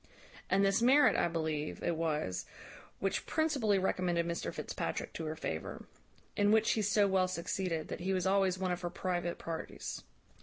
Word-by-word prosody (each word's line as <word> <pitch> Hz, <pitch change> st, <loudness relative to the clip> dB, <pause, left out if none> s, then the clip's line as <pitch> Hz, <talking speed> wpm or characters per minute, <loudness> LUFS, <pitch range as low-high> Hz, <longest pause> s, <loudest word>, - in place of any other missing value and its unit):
"And 195 Hz, +1 st, +4 dB
this 195 Hz, +3 st, +3 dB
merit, 250 Hz, -2 st, +6 dB
I -, -, +3 dB
believe, 160 Hz, -2 st, -2 dB
it 175 Hz, -, +1 dB
was, 150 Hz, -, -1 dB, 0.5 s
which 195 Hz, -, -1 dB
principally 275 Hz, -11 st, +2 dB
recommended 180 Hz, -2 st, +1 dB
Mr 170 Hz, 0 st, -2 dB
Fitzpatrick -, -, -4 dB
to 165 Hz, -, -5 dB
her 155 Hz, 0 st, -3 dB
favour. 80 Hz, -, -5 dB, 0.5 s
In 205 Hz, 0 st, +3 dB
which 220 Hz, 0 st, +4 dB
he 220 Hz, -, +1 dB
so 205 Hz, 0 st, +3 dB
well 190 Hz, -1 st, +3 dB
succeeded, 180 Hz, -2 st, -2 dB
that -, -, -4 dB
he 185 Hz, +2 st, -1 dB
was 185 Hz, -1 st, 0 dB
always 190 Hz, -1 st, +3 dB
one 185 Hz, -1 st, -1 dB
of 180 Hz, 0 st, -2 dB
her 175 Hz, -, -2 dB
private 175 Hz, -1 st, -2 dB
parties. 165 Hz, -1 st, -5 dB
185 Hz, 175 wpm, -33 LUFS, 170-200 Hz, 0.5 s, merit